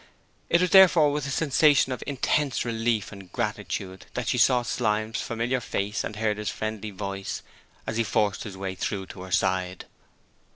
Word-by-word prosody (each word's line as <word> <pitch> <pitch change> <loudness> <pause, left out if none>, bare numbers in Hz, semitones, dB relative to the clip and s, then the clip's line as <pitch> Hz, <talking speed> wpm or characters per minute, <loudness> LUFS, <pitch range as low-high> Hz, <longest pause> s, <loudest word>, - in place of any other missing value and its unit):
It 170 - +4
was 180 - +1
therefore 175 -6 +7
with 145 -1 -2
a - - -4
sensation 145 -1 +3
of 125 - -4
intense 140 0 0
relief 115 -3 -1
and 100 -3 -12
gratitude 95 -1 -4
that - - -2
she - - +1
saw 125 -2 +4
Slyme's 110 -2 -1
familiar 120 +2 -1
face 105 -1 -2
and 105 - -5
heard 105 -1 0
his 105 -2 -2
friendly 110 0 -4
voice 100 0 -5 0.4
as 110 0 -3
he 115 - +3
forced 105 -2 0
his 95 -3 -8
way 95 -1 -3
through 95 +1 -3
to 95 - -10
her 95 0 -9
side. 90 0 0
110 Hz, 175 wpm, -26 LUFS, 100-130 Hz, 0.4 s, therefore